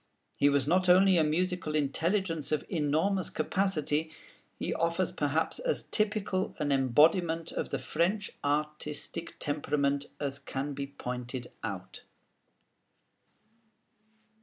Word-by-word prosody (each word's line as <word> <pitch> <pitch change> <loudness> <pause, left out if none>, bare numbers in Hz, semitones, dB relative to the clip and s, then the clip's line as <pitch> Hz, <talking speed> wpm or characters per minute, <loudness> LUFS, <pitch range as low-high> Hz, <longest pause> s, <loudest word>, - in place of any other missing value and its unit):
He 145 - +5
was 140 -2 +2
not 180 +4 +2
only 185 +1 +6
a - - +5
musical 170 0 0
intelligence 165 +3 0
of 155 - 0
enormous 165 +4 +1
capacity: 155 -2 0 0.5
he - - -2
offers 170 +1 0
perhaps 160 -1 0
as - - 0
typical 210 -3 0
an 150 -2 -1
embodiment 160 +6 +3
of - - -3
the - - -1
French 195 +6 0
artistic 150 +2 -3
temperament 145 -1 0
as 140 -1 -3
can 140 +1 -4
be 140 0 -4
pointed 125 -2 -6
out. 95 -4 -5
155 Hz, 110 wpm, -30 LUFS, 145-180 Hz, 0.5 s, only